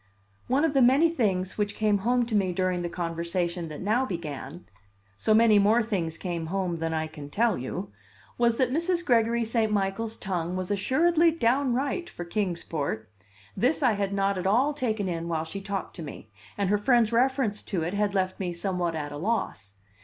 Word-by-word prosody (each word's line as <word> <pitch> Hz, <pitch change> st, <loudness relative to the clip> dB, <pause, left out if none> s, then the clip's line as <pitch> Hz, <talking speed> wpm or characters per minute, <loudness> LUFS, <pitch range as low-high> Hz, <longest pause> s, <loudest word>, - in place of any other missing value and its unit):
One 275 Hz, +5 st, +2 dB
of 310 Hz, -, 0 dB
the 270 Hz, -, +4 dB
many 275 Hz, +7 st, +5 dB
things 195 Hz, -, -1 dB
which 205 Hz, -1 st, 0 dB
came 210 Hz, -2 st, +2 dB
home 245 Hz, +4 st, +2 dB
to 230 Hz, -, -6 dB
me 190 Hz, -3 st, +2 dB
during 185 Hz, 0 st, 0 dB
the 175 Hz, -, -3 dB
conversation 170 Hz, 0 st, -2 dB
that 155 Hz, -1 st, -8 dB
now 220 Hz, +6 st, +2 dB
began 165 Hz, -, -6 dB, 0.5 s
(so 160 Hz, -, -1 dB
many 220 Hz, -2 st, +6 dB
more 215 Hz, +4 st, +4 dB
things 175 Hz, -7 st, -2 dB
came 170 Hz, -3 st, -4 dB
home 180 Hz, -1 st, -1 dB
than 165 Hz, 0 st, -1 dB
I 160 Hz, 0 st, -1 dB
can 150 Hz, -2 st, -9 dB
tell 225 Hz, +5 st, +2 dB
you!) 120 Hz, -5 st, -5 dB, 0.4 s
was 235 Hz, -1 st, +2 dB
that 255 Hz, -2 st, +2 dB
Mrs. 340 Hz, +4 st, 0 dB
Gregory 235 Hz, -1 st, +2 dB
St. 225 Hz, -1 st, 0 dB
Michael's 210 Hz, +3 st, -1 dB
tongue 180 Hz, -2 st, -3 dB
was 185 Hz, +1 st, -3 dB
assuredly 325 Hz, -, +3 dB
"downright" 275 Hz, +3 st, 0 dB
for 175 Hz, -, -7 dB
Kings 180 Hz, -1 st, -2 dB
Port. 140 Hz, -9 st, -3 dB, 0.5 s
This 275 Hz, +5 st, +1 dB
I 245 Hz, -4 st, +4 dB
had 200 Hz, -1 st, -1 dB
not 195 Hz, -1 st, 0 dB
at 180 Hz, -, -1 dB
all 255 Hz, +9 st, +3 dB
taken 220 Hz, -8 st, -1 dB
in 170 Hz, -1 st, -3 dB
while 160 Hz, -1 st, -1 dB
she 195 Hz, +5 st, -6 dB
talked 195 Hz, -1 st, -4 dB
to -, -, -6 dB
me, 140 Hz, -8 st, -9 dB, 0.3 s
and 200 Hz, -1 st, 0 dB
her 210 Hz, -, +3 dB
friend's 235 Hz, 0 st, +3 dB
reference 250 Hz, -3 st, +2 dB
to 180 Hz, -5 st, -2 dB
it 170 Hz, +3 st, -3 dB
had 205 Hz, 0 st, 0 dB
left 185 Hz, -1 st, 0 dB
me 180 Hz, -3 st, -2 dB
somewhat 175 Hz, -1 st, -2 dB
at 145 Hz, -2 st, -4 dB
a 145 Hz, -, -6 dB
loss. 175 Hz, -, -2 dB
200 Hz, 200 wpm, -27 LUFS, 175-235 Hz, 0.5 s, many